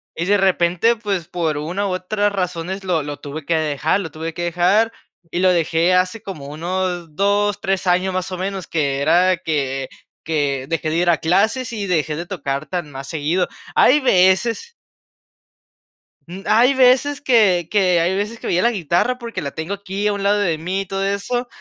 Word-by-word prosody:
y 170 - -2
de 205 +3 +3
repente, 185 +3 +2
pues, 200 -7 -3
por 160 -4 -2
una, 175 +7 -2
u, 195 - -1
otras 205 +3 -1
razones 185 0 -3
lo 170 -5 0
lo 145 0 -6
tuve 145 +1 -7
que 165 - +1
dejar, 155 +3 0
lo 180 -5 -5
tuve 160 +2 -6
que 175 - -4
dejar, 180 +7 +2 0.4
y 175 - -3
lo 185 0 +4
dejé 170 +1 +2
hace 185 +4 +1
como 175 -9 -7
unos 175 +2 -3
2, 200 +3 +1
3 190 -1 -1
años, 185 +1 +2
más 185 0 -3
o 185 - -4
menos, 190 0 -4
que 140 -4 -1
era 180 +5 +4
que 135 -6 -2 0.3
que 145 -4 -1
dejé 165 -1 -1
de 160 - -1
ir 175 +1 +2
a 165 - +4
clases, 220 +9 +1
y 205 -3 -3
dejé 155 -4 0
de 170 +3 -5
tocar 140 -6 -4
tan 175 -1 -4
más 135 -1 -8
seguido. 165 +3 0 0.3
Hay 295 +4 +5
veces 230 - +2 1.5
Mm, 180 +3 -9
hay 245 +5 +4
veces, 265 +2 +3
que 205 - +3
que 185 -4 +3
hay 175 +3 +1
veces 210 +4 -3
que - - -6
veía 180 - +2
la 235 - +3
guitarra 185 +5 0
porque 235 -2 -6
la 140 - -4
tengo 160 +7 -5
aquí 200 +1 -3
a 210 - +1
un 200 - -4
lado 205 +1 +3
de 175 -6 0
mí, 185 +5 -2
y - - -6
todo 195 +1 -3
eso, 200 +5 -2
180 Hz, 195 wpm, -20 LUFS, 165-200 Hz, 1.5 s, Hay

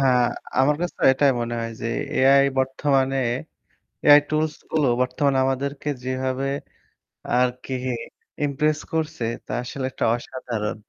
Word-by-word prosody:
হ্যাঁ, 125 -2 +4 0.4
আমার 145 +3 +4
কাছে 175 - -2
তো - - -8
এটাই 140 0 +3
মনে 120 0 -2
হয় 115 0 -4
যে 115 - -3 0.3
AI 140 +1 +5
বর্তমানে 135 0 +1 0.9
AI 145 0 +9
টুলসগুলো 155 -1 0
বর্তমানে 130 +2 +1
আমাদেরকে 140 +2 -2 0.2
যেভাবে 130 +1 -2 0.9
আর 125 0 +4
কি 130 - -5 0.7
impress 150 +2 0
করছে 155 -4 -2 0.2
তা - - -8
আসলে 130 +1 -4
একটা - - -2
অসাধারণ। 120 -4 -4
135 Hz, 125 wpm, -23 LUFS, 130-145 Hz, 0.9 s, AI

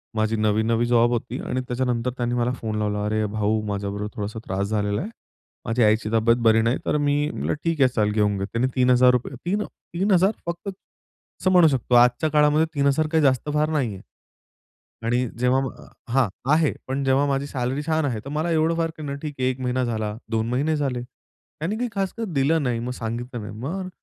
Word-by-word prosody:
माझी 110 +1 +1
नवी-नवी 110 +2 +1
जॉब 120 0 +4
होती 120 0 -2
आणि 130 - -1
त्याच्यानंतर 125 -1 -1
त्यांनी 120 0 -1
मला 120 0 +1
फोन 110 -4 -4
लावला, 105 -1 -1
"अरे 110 0 0
भाऊ! 105 +1 0
माझ्याबरोबर 100 0 -3
थोडासा 105 +2 -4
त्रास 95 +2 -2
झालेला 105 0 -1
आहे. 210 - -5 0.6
माझी 115 +2 +1
आईची 110 0 +2
तब्येत 115 +1 +4
बरी 110 0 +5
नाही." 115 +3 +1
तर - - +1
मी 145 0 +1
म्हटलं - - -2
ठीक 165 -3 0
आहे 130 - +7
चाल 105 -2 +2
घेऊन 105 -1 +1
घे. 95 - -2
त्याने 115 +5 0
3000 125 0 +3
3 200 +4 0
अ, - - -7 0.3
3000 190 +1 +3
फक्त, 170 +3 -5 0.7
असं 185 - +2
म्हणू 180 -3 +7
शकतो. 130 -4 +1
आजच्या 125 +5 +4
काळामध्ये 150 +1 +4
3000 140 +1 +2
काही 160 -2 +3
जास्त 135 +1 +2
फार 150 +1 +2
नाहीये. 125 -11 -1 1.0
आणि 120 +2 +1
जेव्हा. 125 +2 +2
मा 130 - -9 0.3
हां, 135 -3 +4 0.2
आहे. 155 -1 +3
पण 135 +1 -2
जेव्हा 135 +1 +3
माझी 140 0 0
सॅलरी 130 0 -2
छान 160 -1 +1
आहे 120 -6 -1
तर - - -6
मला 155 +4 -1
एवढं 160 +1 +2
फार 165 -1 0
क - - -8
नाही 140 -2 -4
ठीक 150 -2 -5
आहे. 130 0 +2
1 130 0 -4
महिना 130 0 0
झाला, 110 -3 -2 0.2
2 110 0 0
महिने 145 +6 +1
झाले. 135 -5 -1
त्यांनी 155 +8 -8
काही 245 +1 -2
खासकर 195 +4 -2
दिलं 145 +3 +2
नाही. 125 -3 0
मग 120 +2 -4
सांगितलं 120 +1 -5
नाही. 105 - -7
मग 185 +9 -4
125 Hz, 200 wpm, -23 LUFS, 110-150 Hz, 1.0 s, आहे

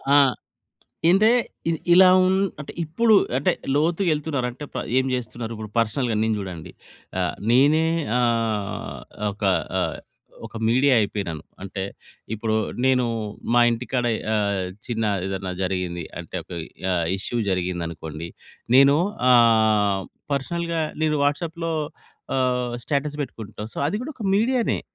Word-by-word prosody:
ఆ! - - +8 0.9
ఇంటే 205 +5 +5 0.4
ఇ - - +2 0.2
ఇలా 185 +1 +8
ఉం 185 +1 +3 0.3
అంటే 145 - -7
ఇప్పుడు 215 +8 +3 0.2
అంటే 135 - +2 0.2
లోతుగా 170 +5 +1
వెళ్తున్నారు. 145 -4 -1
అంటే 130 +5 -9
ప - - -4 0.2
ఏం 130 - +1
చేస్తున్నారు? 115 -1 -4
ఇప్పుడు 110 -1 -7
పర్సనల్‌గా 115 +1 +1
నేను 110 0 +1
చూడండి. 90 -5 -7 0.5
ఆహ్, - - 0 0.2
నేనే 145 +6 +5 0.4
ఆహ్, 115 -4 -1 0.3
ఒక 105 - -15 0.4
ఆహ్, - - -1 0.5
ఒక - - -11
మీడియా 130 +3 +4
అయిపోయినాను. 95 -7 -3 0.2
అంటే 95 0 -5 0.5
ఇప్పుడు 110 0 -1 0.3
నేను 130 -1 +3 0.5
మా - - +7
ఇంటికాడ 125 +1 -2 0.3
ఆహ్, 100 -3 0 0.2
చిన్న 115 -2 -1 0.2
ఏదన్నా 95 -1 -3
జరిగింది 90 -2 -2 0.2
అంటే, 85 - -13
ఒక - - -32 0.4
ఆహ్, 85 -2 0
ఇష్యూ 120 +4 -3
జరిగిందనుకోండి. 85 -3 -3 0.5
నేను 140 +1 +7 0.3
ఆహ్, 110 -4 +4 0.3
పర్సనల్‌గా 170 +4 -1 0.2
నేను 150 -1 +2
వాట్సాప్‌లో, 165 +3 -1 0.7
ఆహ్, 125 -1 0
స్టేటస్ 145 +1 -1
పెట్టుకుంటాం. 110 -4 -7
సో, - - -6
అది 190 - -1
కూడా 300 +4 -5
ఒక 220 - -4
మీడియా‌నే. 240 +3 +1
120 Hz, 130 wpm, -23 LUFS, 100-150 Hz, 0.9 s, ఆ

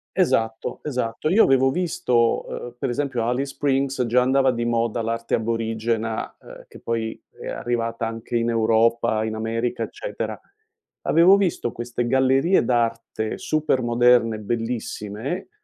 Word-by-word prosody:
esatto, 115 0 0
esatto, 125 -1 -2
io 205 +7 +6
avevo 135 0 +4
visto 125 -7 +1
uhm, 120 0 -7
per 135 - -1
esempio 125 -1 -1
a 115 - 0
Alice 135 +3 -2
Springs 135 -2 0
già 125 +2 +3
andava 130 +1 +3
di 120 -1 -2
moda 115 -1 0
l'arte 115 +1 -1
aborigena, 115 0 -2
ehm, - - -13
che - - -14
poi 115 -1 -3 0.2
è - - -7
arrivata 115 -1 -2
anche 115 +1 -6
in 115 0 +1
Europa, 115 -1 +2
in 110 0 -3
America, 115 +2 -2
eccetera. - - -5 0.6
Avevo 175 +5 +6
visto 180 -11 0
queste 120 0 -3
gallerie 135 +6 +3
d'arte 115 -2 -1
super 155 -4 0
moderne, 120 -1 +3
bellissime, 115 - -4
120 Hz, 140 wpm, -23 LUFS, 115-135 Hz, 0.6 s, io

